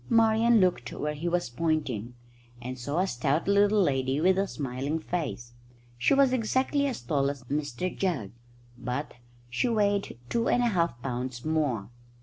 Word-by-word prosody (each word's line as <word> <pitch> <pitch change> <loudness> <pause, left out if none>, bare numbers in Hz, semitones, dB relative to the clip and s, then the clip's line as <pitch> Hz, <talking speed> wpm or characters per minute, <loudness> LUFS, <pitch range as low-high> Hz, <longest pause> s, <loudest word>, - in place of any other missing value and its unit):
Marian 230 0 +5
looked 180 - +1
where 150 0 -2
he 160 +4 -3
was 175 -8 -1
pointing, 125 -6 -1 0.4
and 125 +1 -6
saw 145 +6 -3
a 185 - +3
stout 140 +1 0
little 200 +1 +4
lady 135 -2 +1
with 185 +4 +4
a 195 - +1
smiling 140 +1 -3
face. 150 -8 -4 0.4
She 120 - +3
was 270 -2 +4
exactly 260 +4 +1
as 250 - -4
tall 140 +2 +1
as 140 -2 -6
Mr 145 +4 -3
Jugg, 150 - -1 0.5
but 125 +4 -3 0.3
she 120 - 0
weighed 205 - +1
two 230 - 0
and 245 - +3
a 240 - +3
half 170 - 0
pounds 125 -1 -4
more. 140 -10 0
155 Hz, 160 wpm, -28 LUFS, 125-200 Hz, 0.5 s, Marian